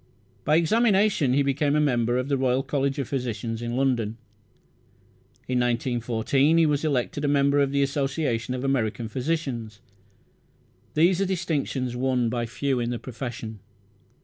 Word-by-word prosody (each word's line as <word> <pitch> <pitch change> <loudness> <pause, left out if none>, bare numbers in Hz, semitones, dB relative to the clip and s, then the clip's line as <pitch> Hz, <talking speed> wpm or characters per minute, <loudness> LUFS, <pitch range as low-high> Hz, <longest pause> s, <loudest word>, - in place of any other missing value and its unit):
By 150 - +4
examination 195 - +3
he 140 +1 +3
became 140 +1 +1
a - - +3
member 120 -5 +1
of 125 +1 -1
the 140 - +1
Royal 130 0 +1
College 140 0 -1
of 135 -4 -2
Physicians, 120 -3 -3
London. 120 -2 0 1.3
In 125 -1 0
1914 120 +4 +1
he 165 - +5
was 150 -1 +1
elected 145 -1 -1
a - - +1
member 140 0 +3
of 140 -1 +2
the 140 0 +2
Association 135 -4 -1
of 125 - -4
American 120 -4 0
Physicians. 125 -5 -3 1.2
These 175 +4 +4
are - - +2
distinctions 145 -8 -2
won 125 -2 +1
by 120 0 -2
few 135 +2 -1
in 120 0 -1
the 120 - -2
profession. 115 -3 -7
135 Hz, 150 wpm, -25 LUFS, 120-145 Hz, 1.3 s, he